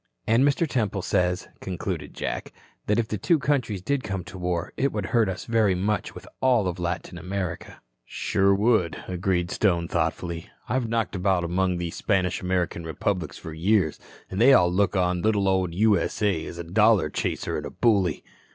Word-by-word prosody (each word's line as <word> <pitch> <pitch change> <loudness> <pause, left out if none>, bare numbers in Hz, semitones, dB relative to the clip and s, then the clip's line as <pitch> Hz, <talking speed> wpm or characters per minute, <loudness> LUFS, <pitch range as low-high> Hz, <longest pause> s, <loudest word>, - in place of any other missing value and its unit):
"And 115 +4 +4
Mr. 145 +4 +2
Temple 105 -8 -1
says," 90 0 0
concluded 90 -3 -5
Jack, - - -4 0.4
"that 105 - +2
if 115 -1 +1
the 105 -3 -3
two 170 - +3
countries 125 -10 -1
did 140 +3 0
come 95 -4 -3
to 95 - -10
war, 90 -1 -2
it 140 +1 +1
would 105 -3 -3
hurt 115 -4 +4
us 95 - -5
very 110 -5 +2
much 105 +4 -1
with - - -10
all 125 -4 +4
Latin 90 0 -4
America." 90 -1 -5 0.2
"Sure 100 +10 +1
would," 105 -5 +2
agreed 90 -1 -1
Stone 85 -5 +1
thoughtfully. 85 0 -2 0.2
"I've 125 -3 -1
knocked 115 -2 -1
about 95 -1 +1
among 90 +1 0
these 85 -1 -4
Spanish 95 -3 0
American 90 -2 -1
republics 85 +4 -2
for 80 - -8
years, 90 0 +1 0.3
an' 95 - -3
they 130 +4 +7
all 90 -7 +5
look 100 +2 +2
on 90 -1 +1
the 110 - +1
little 100 -3 +2
old 95 -3 +1
U.S.A. 100 -3 +1
as 85 - -8
a 85 - -4
dollar 105 +4 +3
chaser - - -2
and - - -3
a - - -6
bully." 100 -8 +1
95 Hz, 180 wpm, -25 LUFS, 90-110 Hz, 0.4 s, they